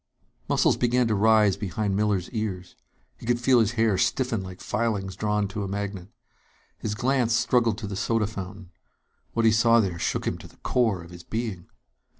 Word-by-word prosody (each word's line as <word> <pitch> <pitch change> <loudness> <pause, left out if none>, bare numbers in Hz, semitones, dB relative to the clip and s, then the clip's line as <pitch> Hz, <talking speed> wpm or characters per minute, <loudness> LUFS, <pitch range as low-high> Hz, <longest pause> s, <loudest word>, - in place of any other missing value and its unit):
Muscles - - +3
began 125 0 +2
to 110 - +1
rise 105 -1 +4
behind 100 +1 -2
Miller's 100 -3 +1
ears. 105 -6 -4 0.4
He - - -10
could 120 0 +2
feel 125 0 +4
his 110 0 +2
hair 110 -5 +2
stiffen 120 0 0
like 95 -1 -9
filings 100 -5 -2
drawn 105 0 0
to 105 +1 -4
a - - -3
magnet. 100 -2 -4 0.7
His 105 -1 -3
glance 120 0 +1
struggled 115 -3 +2
to 110 - -6
the 100 -1 -5
soda 115 +2 +1
fountain. 95 -2 -7 0.6
What 115 -1 +1
he 110 - +6
saw 115 +1 +5
there 95 -6 -1
shook - - -1
him - - -2
to - - -11
the - - -21
core 110 -8 0
of 85 - -13
his 85 0 -10
being. 110 -4 -4
105 Hz, 185 wpm, -26 LUFS, 95-115 Hz, 0.7 s, he